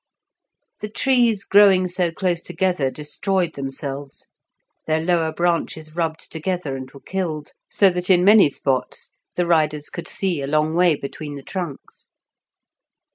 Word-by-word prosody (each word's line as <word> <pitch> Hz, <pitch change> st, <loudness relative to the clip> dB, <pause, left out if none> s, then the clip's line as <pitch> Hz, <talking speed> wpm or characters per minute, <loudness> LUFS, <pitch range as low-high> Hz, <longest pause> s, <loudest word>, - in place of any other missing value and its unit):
The 210 Hz, -, -5 dB
trees 235 Hz, -3 st, +2 dB
growing 195 Hz, -2 st, +5 dB
so 180 Hz, -1 st, 0 dB
close 175 Hz, -1 st, -1 dB
together 175 Hz, -5 st, 0 dB
destroyed 165 Hz, +5 st, -1 dB
themselves, 135 Hz, 0 st, -5 dB, 0.6 s
their 155 Hz, 0 st, +2 dB
lower 165 Hz, -1 st, +1 dB
branches 160 Hz, -2 st, -1 dB
rubbed 165 Hz, -2 st, -3 dB
together 165 Hz, -3 st, -3 dB
and 130 Hz, 0 st, -7 dB
were 140 Hz, -, -14 dB
killed, 160 Hz, -3 st, -4 dB, 0.2 s
so 195 Hz, -2 st, +4 dB
that 180 Hz, +1 st, -3 dB
in 180 Hz, -1 st, +5 dB
many 205 Hz, -5 st, +7 dB
spots 130 Hz, -2 st, -2 dB, 0.2 s
the 175 Hz, -, +1 dB
riders 155 Hz, -3 st, +1 dB
could -, -, -6 dB
see 180 Hz, -7 st, -2 dB
a 135 Hz, -, -3 dB
long 155 Hz, +2 st, +1 dB
way 175 Hz, -1 st, +4 dB
between 145 Hz, +1 st, -7 dB
the 140 Hz, -, -9 dB
trunks. 175 Hz, -6 st, -7 dB
165 Hz, 140 wpm, -21 LUFS, 150-185 Hz, 0.6 s, many